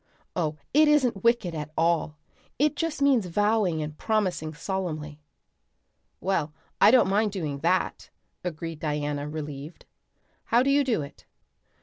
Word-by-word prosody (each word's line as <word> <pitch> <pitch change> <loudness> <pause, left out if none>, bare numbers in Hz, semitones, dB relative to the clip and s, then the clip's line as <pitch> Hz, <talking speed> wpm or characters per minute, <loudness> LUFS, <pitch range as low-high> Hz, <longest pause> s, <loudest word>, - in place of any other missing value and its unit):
Oh, 155 -4 -1 0.2
it 305 +2 +6
isn't 260 -10 +2
wicked 230 -7 +2
at 150 -1 -5
all. 165 -2 +1 0.4
It 300 +2 +2
just 315 -2 -2
means 255 -9 +3
vowing 205 -3 +1
and 150 0 -6
promising 185 -7 -1
solemnly." 155 -4 -4 1.0
"Well, 165 -6 -1 0.3
I - - +9
don't 245 -3 +5
mind 205 +2 +2
doing 150 -8 -3
that," 180 +5 0 0.3
agreed 165 -2 -5
Diana, 150 -1 -2
relieved. 150 0 -7 0.6
"How 240 +2 +3
do 275 - +2
you 285 +1 +4
do 230 - 0
it?" 140 - -13
180 Hz, 135 wpm, -26 LUFS, 155-225 Hz, 1.0 s, I